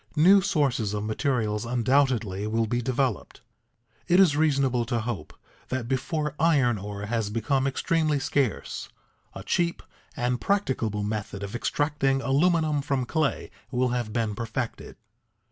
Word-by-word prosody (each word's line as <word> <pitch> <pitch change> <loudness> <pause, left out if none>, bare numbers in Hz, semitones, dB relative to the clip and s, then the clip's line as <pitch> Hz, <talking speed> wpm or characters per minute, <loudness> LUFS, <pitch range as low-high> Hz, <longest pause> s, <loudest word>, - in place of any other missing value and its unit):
New 190 +6 +7
sources 140 - 0
of 105 - -2
materials 110 -1 -1
undoubtedly 120 -4 +1
will 115 +1 +1
be 120 +3 -1
developed. 130 -2 -2 0.7
It 180 - +5
is 175 -7 +5
reasonable 140 -5 +2
to 120 -1 -1
hope 105 -10 -5 0.4
that 130 -2 -3
before 145 +3 -1
iron 135 -9 +3
ore 100 +1 -6
has 110 -1 -1
become 130 +5 0
extremely 155 +2 +1
scarce, 135 -3 -1 0.5
a - - -7
cheap 170 -1 0 0.3
and 125 -1 -1
practicable 125 - 0
method 105 -1 -4
of 100 +1 -6
extracting 135 +1 0
aluminium 155 +2 +2
from 135 -2 -1
clay 155 +2 -1 0.2
will 125 0 +1
have 120 -3 -2
been 115 -2 -1
perfected. 115 +2 -5
125 Hz, 135 wpm, -26 LUFS, 110-145 Hz, 0.7 s, New